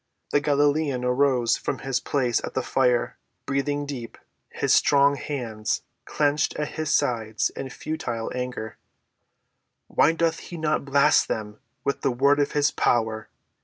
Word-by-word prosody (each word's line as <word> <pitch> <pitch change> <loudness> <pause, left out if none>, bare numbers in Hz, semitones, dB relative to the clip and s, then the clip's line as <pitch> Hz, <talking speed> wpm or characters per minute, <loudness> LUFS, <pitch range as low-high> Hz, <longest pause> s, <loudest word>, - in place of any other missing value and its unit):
The 145 - +3
Galilean 145 -2 +1
rose 125 -2 +2
from - - -3
his 135 -2 0
place 125 -3 0
at - - -6
the 130 - 0
fire, 125 -2 +1 0.3
breathing 145 +1 -1
deep, 130 -5 -7 0.3
his - - 0
strong 140 0 +5
hands 120 -7 -3 0.2
clenched 145 0 +1
at 150 - -2
his 155 -1 -4
sides 115 -7 0
in 135 - -6
futile 120 -6 -4
anger. 125 -3 -5 1.1
"Why 160 - +3
doth 165 0 0
he 175 - -9
not 155 -2 0
blast 140 0 +4
them 105 -1 -4 0.2
with 140 - -1
the 140 - +1
word 140 +4 +3
of 145 - 0
his 145 -1 +2
power?" 110 -2 0
140 Hz, 145 wpm, -25 LUFS, 120-145 Hz, 1.1 s, strong